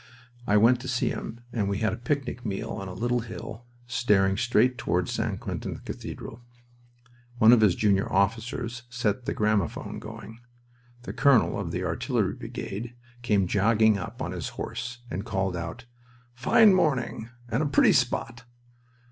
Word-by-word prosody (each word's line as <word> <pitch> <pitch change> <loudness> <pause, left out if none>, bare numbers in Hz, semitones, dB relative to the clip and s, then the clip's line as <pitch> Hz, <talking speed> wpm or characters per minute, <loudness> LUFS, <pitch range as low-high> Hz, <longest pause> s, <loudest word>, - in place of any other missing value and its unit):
I 105 - +4
went 120 +4 +5
to 130 - -7
see 125 0 0
him, 115 - -6
and 105 -4 0
we 100 - -1
had 110 0 0
a - - -4
picnic 130 0 -3
meal 110 +1 -3
on 95 -2 -5
a 90 - -6
little 120 +4 0
hill 115 0 -8 0.2
staring 105 -6 +2
straight 125 +2 +2
toward - - 0
St. - - -2
Quentin - - -5
cathedral. 115 - -7 1.0
One 115 -1 +7
of 120 - +5
his 100 -5 +4
junior 100 -2 +1
officers 115 +4 -1
set 120 -1 -1
the - - -1
gramophone 105 -5 -1
going. 110 +1 -10 0.6
The - - -6
colonel 130 +1 +3
of - - -3
the - - -3
artillery - - 0
brigade 115 +5 -6 0.3
came 105 -5 +2
jogging 110 +2 +3
up 90 - -6
on - - -3
his - - -4
horse 120 +1 -5
and 95 +4 -3
called 95 -4 -1
out, 85 +8 -6 0.5
"Fine 195 - +5
morning, 130 -9 0 0.2
and 120 +4 0
a 155 - +1
pretty 140 - +5
spot!" 120 -2 0
115 Hz, 160 wpm, -27 LUFS, 105-125 Hz, 1.0 s, One